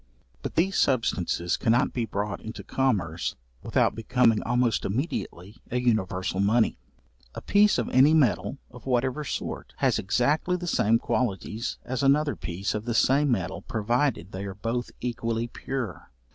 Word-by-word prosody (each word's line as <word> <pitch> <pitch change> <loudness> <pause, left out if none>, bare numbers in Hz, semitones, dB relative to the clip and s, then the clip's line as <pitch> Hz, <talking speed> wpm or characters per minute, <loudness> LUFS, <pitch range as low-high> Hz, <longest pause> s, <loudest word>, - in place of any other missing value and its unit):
But - - -5
these 190 +4 +2
substances 95 -8 +1
cannot 120 +1 +2
be 120 -2 -1
brought 100 0 -3
into 110 +1 -7
commerce 95 -11 -1 0.3
without - - +2
becoming 115 -1 +2
almost 125 -3 +1
immediately 105 - -3
a 125 - 0
universal 95 -6 0
money. 110 - +2 0.6
A - - -5
piece 205 +1 +4
of - - -1
any 140 +5 +5
metal, 110 - +2
of 125 +1 -13
whatever 130 +3 0
sort, - - -5
has - - +2
exactly 145 - +1
the 180 0 -4
same 115 -9 +3
qualities 115 -1 -2
as 130 -1 -3
another 145 +2 +3
piece 85 +5 -3
of 105 +1 -4
the 120 -2 -1
same 140 +5 +3
metal 100 -9 -1
provided 115 - -1
they 95 +1 -5
are 95 -1 -6
both 115 +4 -3
equally 115 -1 -2
pure. 120 - -5
120 Hz, 150 wpm, -26 LUFS, 100-130 Hz, 0.6 s, any